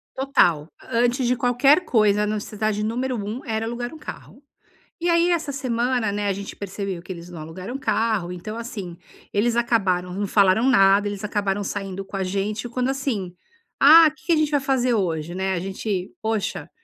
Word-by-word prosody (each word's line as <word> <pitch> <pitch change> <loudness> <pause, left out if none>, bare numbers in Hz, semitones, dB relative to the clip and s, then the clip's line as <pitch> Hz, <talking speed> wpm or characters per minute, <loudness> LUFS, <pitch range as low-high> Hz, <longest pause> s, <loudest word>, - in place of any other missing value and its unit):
Total, 175 - +2
a 230 - -5
antes 245 +1 +2
de 250 - +2
qualquer 250 +8 +3
coisa 210 - +3
a - - +1
necessidade 210 0 -2
número 250 +2 -2
1 210 +5 -5
era 220 0 -2
um - - -3
alugar 240 +3 -5
carro. 300 -2 -10 0.6
E 345 +1 0
aí 340 +1 +3
essa 320 -5 0
semana, 245 -4 0
né, 205 0 -2
a 195 - +1
gente 200 +1 -7
percebeu 195 -2 -5
que 185 +2 -7
eles 170 0 -11
não 170 -3 -9
alugaram 185 +10 -7
um - - -1
carro 220 -8 0
então, 215 +6 -7
assim, 200 -7 -6 0.4
eles 230 +3 +1
acabaram 190 -7 +1
não 200 +1 -2
falaram 200 +5 +4
nada, 200 -3 +5
eles 205 0 -5
acabaram 205 -1 -1
saindo 195 -1 -4
com 195 0 -7
a 190 - -1
gente 200 +4 -2
e - - -5
quando, 250 +2 -1
assim: 235 -10 -2 0.5
"Ah 310 +2 +8
que 310 - -23
que 340 - +3
a - - +5
gente 305 -1 +1
vai 290 - +3
fazer 260 -2 +1
hoje." 170 -5 -1
Né, 190 +1 -1
a 175 - -1
gente: 190 0 -3
"Poxa, 220 -2 -2
215 Hz, 200 wpm, -23 LUFS, 195-250 Hz, 0.6 s, Ah